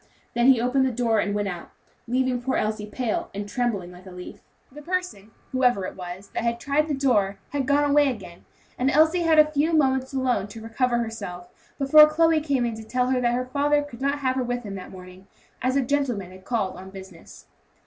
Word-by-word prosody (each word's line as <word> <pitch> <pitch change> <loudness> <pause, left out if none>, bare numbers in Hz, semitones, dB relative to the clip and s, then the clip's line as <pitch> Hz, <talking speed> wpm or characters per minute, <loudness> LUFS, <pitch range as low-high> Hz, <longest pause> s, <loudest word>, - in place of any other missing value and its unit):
He 240 +3 +5
then - - -3
opened 250 +3 +2
the - - -1
door 230 -2 +1
and 205 0 -1
went 205 -1 -1
out, 175 -3 -6 0.4
leaving 255 0 0
poor 260 +1 -1
Elsie 215 0 -2
pale, 225 +1 -3
and 205 0 -4
trembling 205 -6 -2
like 180 +1 -14
a - - -10
leaf. 180 0 -10 0.3
The 295 +3 -11
person, 360 - -4 0.2
whoever 250 -7 +2
it - - -6
was, 180 +1 -8
that - - -3
had 235 0 -1
tried 290 +4 0
the 295 - -1
door 210 -8 +1
had 280 -3 -2
gone 290 +1 +3
away 290 0 +4
again, 195 -8 -8 0.4
and 255 +2 +2
Elsie 315 +5 +4
had 325 -2 +3
a 305 0 +6
few 305 +3 +1
moments 265 -3 +2
alone 255 -7 0
to 210 +2 -10
recover 240 +2 0
herself, 205 -7 -5 0.3
before 300 +2 +7
Chloe 325 0 +3
came 280 -5 0
to 220 0 -8
tell 250 +3 0
her 255 -1 +1
that 240 0 +1
her 250 +1 -1
father 290 +3 +1
could 265 -4 -11
not 280 +1 0
have 260 -1 0
her 260 - 0
with 245 0 -3
him 205 -2 -6
that 190 -2 -8
morning, 185 +1 -13 0.3
as 255 +1 0
a 275 - +2
gentleman 245 -9 -1
had 185 0 -15
called 220 -6 -2
on 190 +1 -10
business. 190 -3 -13
245 Hz, 220 wpm, -24 LUFS, 205-280 Hz, 0.4 s, before